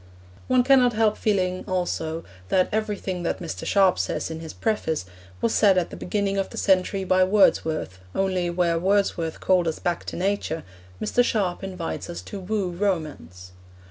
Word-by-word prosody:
One 255 Hz, -1 st, +4 dB
cannot 255 Hz, -2 st, +5 dB
help 215 Hz, -1 st, +2 dB
feeling 185 Hz, -3 st, 0 dB
also 165 Hz, -3 st, -2 dB, 0.3 s
that 185 Hz, -1 st, +3 dB
everything 205 Hz, -4 st, -2 dB
that 170 Hz, -, -1 dB
Mr. 170 Hz, -3 st, -6 dB
Sharp 195 Hz, -3 st, +4 dB
says -, -, -2 dB
in 160 Hz, -, -5 dB
his 160 Hz, -1 st, -7 dB
preface 185 Hz, -, -1 dB, 0.4 s
was 230 Hz, -, +1 dB
said 200 Hz, -3 st, +5 dB
at 180 Hz, -, 0 dB
the -, -, -7 dB
beginning 200 Hz, +1 st, -1 dB
of 195 Hz, -, -1 dB
the -, -, -10 dB
century 190 Hz, 0 st, +2 dB
by 185 Hz, 0 st, +3 dB
Wordsworth, 160 Hz, -, +2 dB, 0.2 s
only 185 Hz, -2 st, 0 dB
where 170 Hz, -1 st, +1 dB
Wordsworth 185 Hz, -3 st, 0 dB
called 180 Hz, -2 st, +2 dB
us 160 Hz, -, -1 dB
back 175 Hz, -1 st, -2 dB
to -, -, -5 dB
nature, 185 Hz, -3 st, -1 dB, 0.4 s
Mr. 245 Hz, -, +2 dB
Sharp 195 Hz, -7 st, -1 dB
invites 185 Hz, -3 st, -5 dB
us 175 Hz, -, -6 dB
to 200 Hz, -, -7 dB
woo 195 Hz, -1 st, -2 dB
romance. 155 Hz, -, -3 dB
185 Hz, 170 wpm, -24 LUFS, 170-200 Hz, 0.4 s, cannot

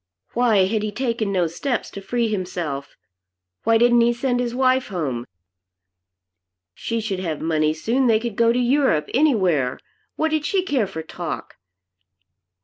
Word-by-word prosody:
Why 225 Hz, -6 st, +3 dB
had 215 Hz, +2 st, 0 dB
he 210 Hz, 0 st, -2 dB
taken 230 Hz, -2 st, -1 dB
no 185 Hz, -3 st, +2 dB
steps 235 Hz, -, -3 dB
to 200 Hz, -, -8 dB
free 235 Hz, +4 st, 0 dB
himself? 175 Hz, -9 st, -4 dB, 0.7 s
Why 225 Hz, 0 st, +5 dB
didn't 240 Hz, +1 st, +5 dB
he 235 Hz, +1 st, +3 dB
send 245 Hz, +1 st, -1 dB
his 245 Hz, -1 st, -2 dB
wife 260 Hz, 0 st, +2 dB
home? 140 Hz, -, -3 dB, 1.5 s
She 230 Hz, -, -3 dB
should 205 Hz, -4 st, -3 dB
have 165 Hz, -5 st, -3 dB
money 155 Hz, -1 st, +1 dB
soon. 245 Hz, +10 st, +1 dB
They 220 Hz, -2 st, +4 dB
could 235 Hz, -2 st, -4 dB
go 230 Hz, +1 st, +4 dB
to 240 Hz, -, 0 dB
Europe 250 Hz, -, +2 dB
anywhere. 185 Hz, -, +2 dB, 0.4 s
What 315 Hz, 0 st, 0 dB
did 310 Hz, -1 st, 0 dB
she 370 Hz, +5 st, +1 dB
care 270 Hz, -, 0 dB
for 160 Hz, -4 st, -6 dB
talk? 170 Hz, 0 st, -6 dB
225 Hz, 155 wpm, -22 LUFS, 175-245 Hz, 1.5 s, Why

